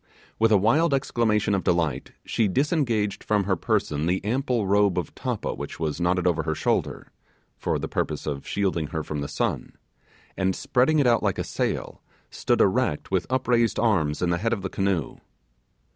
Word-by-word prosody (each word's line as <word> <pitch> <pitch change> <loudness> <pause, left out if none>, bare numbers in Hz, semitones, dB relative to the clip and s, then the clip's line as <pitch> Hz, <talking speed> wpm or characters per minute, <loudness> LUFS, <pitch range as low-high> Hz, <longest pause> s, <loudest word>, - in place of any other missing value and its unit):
With 115 0 +4
a 105 - +6
wild 140 - +3
exclamation 110 -6 +1
of 95 - 0
delight, 80 -6 0
she 115 - +1
disengaged 120 - 0
from 105 -2 +1
her 95 0 +1
person 75 -2 -1
the 95 +3 -1
ample 125 -1 0
robe 100 -1 +3
of 90 - -3
tappa - - -3
which - - -7
was 80 +1 -2
knotted 90 0 +1
over 85 -3 +2
her 80 -1 -2
shoulder - - -1 0.4
(for - - -1
the - - -4
purpose - - -2
of 70 -2 -4
shielding 95 -6 -1
her 80 +1 -4
from 75 -1 -4
the 70 - -3
sun), - - -2 0.6
and 95 -1 0
spreading 130 +5 +2
it 145 - +3
out 120 -2 +4
like 100 -3 0
a - - -1
sail, - - -3 0.3
stood - - +1
erect 75 - +1
with 95 -2 0
upraised 120 -2 +1
arms 85 -10 +1
in 90 - +1
the 85 - 0
head 115 +4 0
of 100 -5 -3
the 95 - -2
canoe. 95 -6 -1
100 Hz, 185 wpm, -25 LUFS, 85-115 Hz, 0.6 s, a